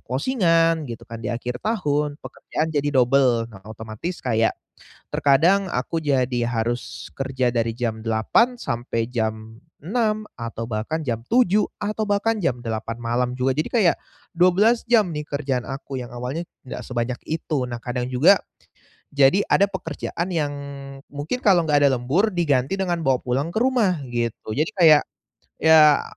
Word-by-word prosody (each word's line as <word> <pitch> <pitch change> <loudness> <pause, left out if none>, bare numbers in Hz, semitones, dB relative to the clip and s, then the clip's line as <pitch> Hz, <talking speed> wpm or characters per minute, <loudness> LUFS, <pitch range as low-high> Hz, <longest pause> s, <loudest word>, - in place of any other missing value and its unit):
closing-an 165 - +1
gitu 115 0 -8
kan, 115 -1 -9
di 105 - -4
akhir 120 +1 -4
tahun 150 -9 -1
pekerjaan 160 +1 -4
jadi 145 -1 0
double. 125 -2 +3
Nah, 95 - -12
otomatis 110 - -7
kayak, 115 -2 +1 0.5
terkadang 170 +8 +3
aku 165 -1 -2
jadi 130 -6 0
harus 120 +1 -3
kerja 130 -2 0
dari 115 -1 -1
jam 115 -2 -3
8.00 115 - +2
sampai 120 - -3
jam 110 -1 -3 0.2
6.00, 215 +3 -1
atau 115 -1 -5
bahkan 115 +9 -2
jam 115 -5 -3
7.00, 210 - +3 0.2
atau 215 +1 -2
bahkan 205 +2 +1
jam 125 -7 0
8.00 115 0 -4
malam 120 +1 0
juga, 130 +1 0
jadi, 155 - -1
kayak 205 -8 +3 0.4
12 190 +7 +4
jam 220 -5 +5
nih, 150 - -3
kerjaan 140 -4 -2
aku, 135 +1 -7
yang 120 - -11
awalnya 125 +7 -4 0.2
nggak - - -6
sebanyak 120 0 -2
itu. 155 -3 -2
Nah, 120 -1 -5
kadang 125 +1 -4
juga, 160 +10 +5 0.7
jadi 140 +8 +4
ada 200 0 +3
pekerjaan 170 -1 -4
yang 145 -3 0 0.6
mungkin 145 +12 -3
kalau 185 -5 +5
nggak 145 -2 +3
ada 135 - +3
lembur, 165 - 0
diganti 145 -2 +1
dengan 180 -3 -1
bawa 130 -2 +2
pulang 135 +5 -1
ke - - +1
rumah, 215 - +1
gitu, 120 -2 -3
jadi 150 - 0
kayak, 160 -5 +6 0.6
ya, 155 -2 +6
140 Hz, 155 wpm, -23 LUFS, 120-175 Hz, 0.7 s, kayak